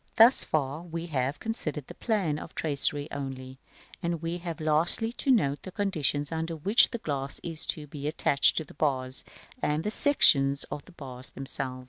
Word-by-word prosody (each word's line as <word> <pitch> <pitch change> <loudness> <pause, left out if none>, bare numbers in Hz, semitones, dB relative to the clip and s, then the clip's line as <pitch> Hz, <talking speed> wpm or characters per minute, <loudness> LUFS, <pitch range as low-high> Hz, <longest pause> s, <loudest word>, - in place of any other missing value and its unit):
§ - - -42
XVII. - - -38
Thus 230 +4 +7
far 145 0 -2
we 170 -1 -6
have 140 -3 -2
considered 155 - -3
the - - -10
plan 190 -10 -1
of - - -8
the - - -27
tracery 145 -1 0
only: 130 -2 -6 0.4
we 170 0 -2
have 170 -1 -6
lastly 160 +9 +3
to 275 - -3
note 145 - +2
the 185 - -9
conditions 155 -8 0
under 165 +1 -3
which 200 +9 +5
the 235 - -4
glass 140 -8 -4
is 165 -2 -5
to 150 - -2
be 145 0 -7
attached 140 -2 +2
to 160 - 0
the 150 - -15
bars; 130 -3 +1 0.4
and 150 +2 0
the 210 - -2
sections 140 - +4
of 145 - -5
the - - -16
bars 130 -6 -9
themselves. 135 -1 -6
150 Hz, 190 wpm, -28 LUFS, 140-170 Hz, 0.4 s, Thus